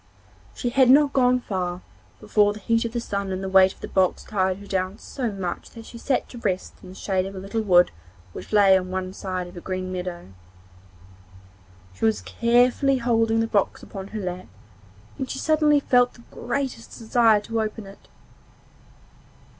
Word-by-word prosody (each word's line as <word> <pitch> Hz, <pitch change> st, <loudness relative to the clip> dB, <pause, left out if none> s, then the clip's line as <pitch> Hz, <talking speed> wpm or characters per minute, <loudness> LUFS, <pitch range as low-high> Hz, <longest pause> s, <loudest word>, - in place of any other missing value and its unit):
She 245 Hz, -, -2 dB
had 260 Hz, 0 st, +4 dB
not 285 Hz, +1 st, +5 dB
gone 250 Hz, -1 st, +3 dB
far 180 Hz, -4 st, -3 dB, 0.4 s
before 205 Hz, -1 st, +2 dB
the 210 Hz, -, -10 dB
heat 230 Hz, +3 st, +1 dB
of 230 Hz, -, -3 dB
the 240 Hz, -, -2 dB
sun 200 Hz, -4 st, -3 dB
and 185 Hz, +1 st, -3 dB
the -, -, -3 dB
weight 190 Hz, 0 st, +6 dB
of -, -, -18 dB
the -, -, -5 dB
box 185 Hz, -2 st, +1 dB
tired 190 Hz, -3 st, -1 dB
her 185 Hz, 0 st, -1 dB
so 255 Hz, -4 st, -4 dB
much 190 Hz, -3 st, -5 dB
that 230 Hz, -1 st, -12 dB
she 235 Hz, -, -11 dB
sat 265 Hz, +2 st, 0 dB
down 240 Hz, -, -11 dB
to -, -, 0 dB
rest 185 Hz, -1 st, -3 dB
in 185 Hz, -, -12 dB
the 185 Hz, -, -11 dB
shade 190 Hz, -1 st, -1 dB
of 195 Hz, -, -9 dB
a -, -, -6 dB
little 200 Hz, +4 st, -3 dB
wood 180 Hz, -4 st, +4 dB, 0.4 s
which -, -, -9 dB
lay 200 Hz, -2 st, +6 dB
on 185 Hz, -1 st, -1 dB
one 185 Hz, 0 st, -4 dB
side 185 Hz, -2 st, -4 dB
of 175 Hz, -, -12 dB
a 175 Hz, -, -8 dB
green 185 Hz, 0 st, -4 dB
meadow. 180 Hz, -, -6 dB, 1.6 s
She -, -, -11 dB
was 220 Hz, -1 st, +1 dB
carefully 245 Hz, +3 st, +2 dB
holding 225 Hz, -2 st, +1 dB
the -, -, +1 dB
box 205 Hz, -3 st, 0 dB
upon 195 Hz, -1 st, -8 dB
her 215 Hz, -, -6 dB
lap 180 Hz, -1 st, -5 dB, 0.7 s
when 265 Hz, -, -3 dB
she -, -, -5 dB
suddenly 305 Hz, 0 st, +3 dB
felt 245 Hz, -3 st, +2 dB
the 235 Hz, -, -17 dB
greatest 245 Hz, -2 st, -4 dB
desire 225 Hz, -2 st, +3 dB
to 225 Hz, +1 st, -2 dB
open 215 Hz, 0 st, -4 dB
it. 195 Hz, +1 st, -15 dB
210 Hz, 190 wpm, -24 LUFS, 185-240 Hz, 1.6 s, weight